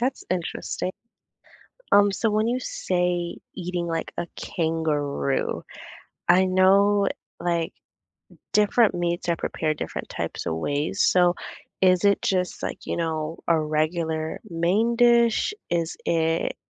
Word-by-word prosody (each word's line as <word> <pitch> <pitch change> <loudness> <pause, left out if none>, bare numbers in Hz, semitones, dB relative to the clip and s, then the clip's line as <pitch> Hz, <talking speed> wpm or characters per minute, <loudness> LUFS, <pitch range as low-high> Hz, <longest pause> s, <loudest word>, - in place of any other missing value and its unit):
That's 255 +2 -1
interesting. 185 +1 -3 1.0
Um, 205 0 +6
so 220 +2 0
when 215 +2 +1
you 250 +1 +1
say 180 -5 -1 0.2
eating, 175 -1 -3
like, 165 -1 -3
a 170 - -1
kangaroo, 155 -5 -1 0.7
I 185 +2 +6
know, 195 +2 +4 0.3
like, 170 -2 -1 0.8
different 210 +2 +4
meats 175 0 -2
are 170 - +2
prepared 155 -1 -2
different - - -5
types - - -4
of 80 - -1
ways, 145 - -1
so 180 -1 +4 0.5
is 185 0 +4
it 200 0 +4
just, 180 -2 -1
like, - - -5
you - - -2
know, 160 -1 -2
a 165 - +4
regular 155 +1 -1
main 185 +8 +1
dish? 235 - +4 0.2
Is 170 -1 -1
it 165 0 +1
175 Hz, 125 wpm, -25 LUFS, 165-200 Hz, 1.0 s, Um